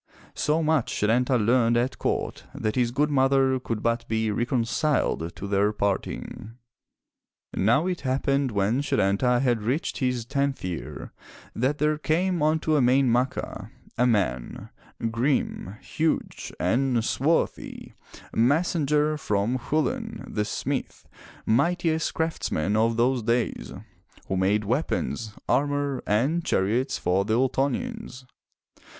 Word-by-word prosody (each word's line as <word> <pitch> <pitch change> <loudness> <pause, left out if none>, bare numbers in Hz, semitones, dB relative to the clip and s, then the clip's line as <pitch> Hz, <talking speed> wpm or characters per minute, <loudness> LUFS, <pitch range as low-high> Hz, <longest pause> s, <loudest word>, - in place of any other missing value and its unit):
So 155 +2 +1
much 155 -5 +1
Setanta 125 +4 +2
learned 120 +1 +3
at 125 +2 -1
court - - -2
that 110 - -1
his 125 -2 +2
good 150 +5 0
mother 135 -1 +3
could 115 -4 -4
but 115 0 0
be 110 -1 0
reconciled 120 - 0
to 100 - -6
their 100 +1 +2
parting. 105 +2 -3 1.0
Now 120 - +2
it 185 -2 -2
happened 135 +1 0
when 105 +4 +1
Setanta 120 0 +2
had 120 -4 +1
reached 125 +9 -2
his 125 -4 -1
tenth 140 +2 -1
year 90 -3 -6 0.4
that 130 +5 0
there 150 0 +1
came 175 +2 0
unto 155 +1 +1
Emain 130 -1 +4
Macha 125 +2 -1 0.3
a 125 - +3
man, 95 - -1 0.4
grim, 115 - -1
huge, 160 0 -2
and 120 +4 +1
swarthy, 155 +8 -1 0.4
messenger 150 +3 +2
from 105 +1 0
Chulain, 220 - -2
the 105 -1 -2
smith, - - -4 0.4
mightiest 160 +6 +1
craftsman 110 - -1
of 115 +1 +2
those 125 +1 +2
days, 115 +2 -1 0.6
who 95 - -1
made 100 +3 +2
weapons, 115 -2 -2
armor 145 -1 0
and 135 +12 +1
chariots 125 - 0
for 90 +2 +1
the 110 +2 0
Ultonians. 135 - -1
125 Hz, 120 wpm, -25 LUFS, 110-145 Hz, 1.0 s, Emain